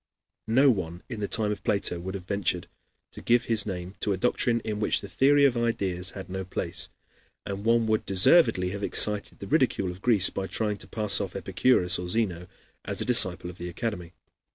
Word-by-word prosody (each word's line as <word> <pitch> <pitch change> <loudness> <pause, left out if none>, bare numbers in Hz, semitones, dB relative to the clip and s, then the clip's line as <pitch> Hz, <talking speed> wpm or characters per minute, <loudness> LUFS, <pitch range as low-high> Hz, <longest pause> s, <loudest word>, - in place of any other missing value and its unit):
No 130 +5 +4
one 90 -5 -5
in 115 -4 -6
the 100 - -2
time 105 -1 0
of 105 - -6
Plato 95 -3 0
would 95 +3 -6
have 95 -2 -7
ventured 100 0 -2 0.4
to - - -11
give 120 0 +2
his 110 -2 0
name 90 -1 -6
to 100 - -1
a - - -3
doctrine 120 +2 +1
in 105 -1 -4
which 105 - 0
the 100 - -8
theory 140 +8 +3
of 130 -3 +2
ideas 95 -6 -1
had 95 - -8
no 95 +1 -5
place, 90 - -4 0.6
and 100 0 -5
one 115 0 +3
would 110 -1 -1
deservedly 95 - +4
have 100 0 -6
excited 105 0 0
the - - -9
ridicule 95 -2 +1
of 90 +2 -12
Greece 105 -5 +4
by 95 - -4
trying 105 -1 -2
to - - -10
pass 105 -3 +2
off 95 -3 -6
Epicurus 95 0 +2
or 90 - -5
Zeno 90 -4 -1 0.4
as - - -4
a - - +1
disciple 95 -8 +4
of 90 - -17
the 90 0 -5
Academy. 90 -3 -5
100 Hz, 205 wpm, -26 LUFS, 90-115 Hz, 0.6 s, No